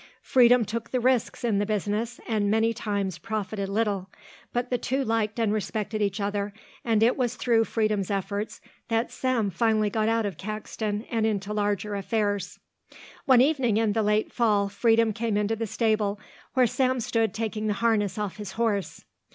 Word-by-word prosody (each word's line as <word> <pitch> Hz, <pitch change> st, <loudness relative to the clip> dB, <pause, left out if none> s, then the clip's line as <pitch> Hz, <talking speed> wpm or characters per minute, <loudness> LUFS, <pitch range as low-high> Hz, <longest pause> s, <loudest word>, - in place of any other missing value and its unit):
Freedom 245 Hz, -2 st, +5 dB
took 230 Hz, +3 st, -4 dB
the 255 Hz, -, 0 dB
risks 250 Hz, -1 st, +1 dB
in 220 Hz, -4 st, +1 dB
the -, -, +2 dB
business 215 Hz, +3 st, -2 dB
and 210 Hz, -3 st, +1 dB
many 225 Hz, +2 st, +2 dB
times 200 Hz, -5 st, -2 dB
profited 205 Hz, -2 st, -3 dB
little, 200 Hz, -2 st, -1 dB, 0.4 s
but 245 Hz, +1 st, -2 dB
the 245 Hz, -, +2 dB
two 270 Hz, +2 st, -1 dB
liked 220 Hz, -1 st, 0 dB
and 225 Hz, -3 st, +1 dB
respected 215 Hz, 0 st, -2 dB
each 200 Hz, 0 st, 0 dB
other 200 Hz, 0 st, -2 dB, 0.3 s
and 225 Hz, -2 st, +2 dB
it 240 Hz, +2 st, +4 dB
was 250 Hz, -2 st, -1 dB
through 230 Hz, -3 st, +2 dB
Freedom's 215 Hz, -4 st, 0 dB
efforts 200 Hz, +1 st, -3 dB, 0.3 s
that 230 Hz, +1 st, 0 dB
Sam 245 Hz, -6 st, 0 dB
finally 215 Hz, +2 st, +1 dB
got 220 Hz, 0 st, +1 dB
out 225 Hz, -1 st, +1 dB
of 195 Hz, -6 st, -4 dB
Caxton 215 Hz, +1 st, -4 dB
and 225 Hz, -2 st, +1 dB
into 205 Hz, -1 st, -2 dB
larger 205 Hz, 0 st, -1 dB
affairs. 205 Hz, 0 st, -1 dB, 0.7 s
One 260 Hz, -4 st, +6 dB
evening 260 Hz, -6 st, +2 dB
in 220 Hz, -2 st, +2 dB
the 225 Hz, -, +1 dB
late 210 Hz, +1 st, +1 dB
fall 210 Hz, -4 st, +2 dB
Freedom 225 Hz, +2 st, +3 dB
came 225 Hz, -1 st, -1 dB
into 210 Hz, +2 st, +1 dB
the 225 Hz, 0 st, -3 dB
stable 210 Hz, -2 st, 0 dB, 0.4 s
where 255 Hz, -1 st, +5 dB
Sam 255 Hz, +2 st, +1 dB
stood 225 Hz, -2 st, 0 dB
taking 220 Hz, 0 st, -3 dB
the 210 Hz, -, +1 dB
harness 215 Hz, -2 st, +1 dB
off 210 Hz, -3 st, -3 dB
his 205 Hz, -3 st, -7 dB
horse. 210 Hz, -6 st, -1 dB
215 Hz, 175 wpm, -26 LUFS, 205-230 Hz, 0.7 s, One